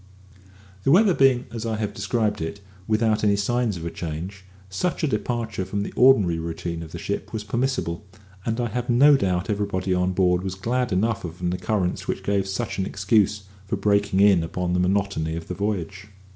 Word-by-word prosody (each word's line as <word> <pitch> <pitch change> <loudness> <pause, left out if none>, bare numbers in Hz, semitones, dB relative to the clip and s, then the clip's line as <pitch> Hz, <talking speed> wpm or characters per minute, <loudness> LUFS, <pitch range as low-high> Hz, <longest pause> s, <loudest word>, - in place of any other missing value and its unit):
The - - +1
weather 190 +5 +6
being 130 -4 +3
as 115 -2 -4
I 115 -1 -1
have 105 -1 -3
described 105 -1 -1
it, 80 +6 -4 0.3
without 110 0 +1
any 100 -1 +4
signs 110 0 0
of 85 - -7
a 85 - -3
change, 90 +4 -6 0.2
such 165 - -2
a - - +3
departure 115 -4 -2
from 100 +2 -3
the - - -6
ordinary 105 -10 +5
routine 85 0 -4
of 80 - -9
the - - -6
ship - - -4
was 110 -2 -4
permissible, 110 -5 -2 0.4
and 115 +3 -2
I 120 -1 0
have 120 +2 -3
no 140 +5 +6
doubt 90 -8 0
everybody 100 -3 -1
on 90 0 +1
board 90 -1 +2
was 95 -1 -3
glad 125 +5 -1
enough 105 +4 0
of 85 0 -7
an 90 0 -1
occurrence 90 0 -1
which - - -3
gave 100 -1 0
such 95 +1 -3
an 95 - 0
excuse 100 0 +1 0.2
for 110 - -1
breaking 100 -1 +2
in 100 -4 +6
upon 90 +1 -2
the 90 - +1
monotony 90 -4 0
of 85 0 -6
the - - -4
voyage. 100 -1 -3
100 Hz, 200 wpm, -24 LUFS, 90-115 Hz, 0.4 s, weather